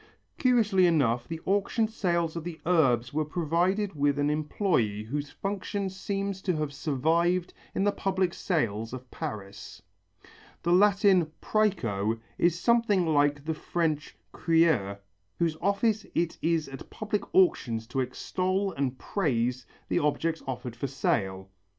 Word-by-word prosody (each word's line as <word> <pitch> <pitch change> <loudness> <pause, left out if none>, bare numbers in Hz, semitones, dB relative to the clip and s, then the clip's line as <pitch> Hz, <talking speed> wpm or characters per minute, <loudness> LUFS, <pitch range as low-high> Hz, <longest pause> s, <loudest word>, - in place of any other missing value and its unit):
Curiously 215 -8 +4
enough 125 -8 +2
the 165 -1 -5
auction 205 +3 +1
sales 170 -6 -1
of 165 - -4
the 170 -1 -6
Urbs 130 -9 +2
were 155 +1 +1
provided 175 +6 0
with 145 -1 +1
an 145 0 +1
employé 150 - 0
whose 145 +5 -3
function 200 0 -3
seems 195 0 -3
to 185 -3 0
have 150 -2 -2
survived 165 +6 +1 0.2
in 190 - +1
the 205 - +3
public 190 -3 0
sales 115 - -1
of 130 0 -8
Paris. 100 -2 -7 0.8
The 175 +1 +2
Latin 195 -3 +4
præco 115 - 0 0.2
is 170 0 +2
something 230 -5 +3
like 145 -2 +2
the 160 - 0
French 155 -1 -2
crieur 160 - +2 0.4
whose 165 -2 +1
office 205 +3 +1
it 170 -1 0
is 165 -2 +1
at 135 -1 -9
public 210 -1 -2
auctions 120 -11 +3
to 135 - -2
extol 185 +9 -1
and 135 -3 -2
praise 125 - -1 0.2
the - - +1
objects 160 +2 0
offered 125 -2 -5
for 130 +4 -3
sale. 95 -7 -1
165 Hz, 140 wpm, -28 LUFS, 135-190 Hz, 0.8 s, Curiously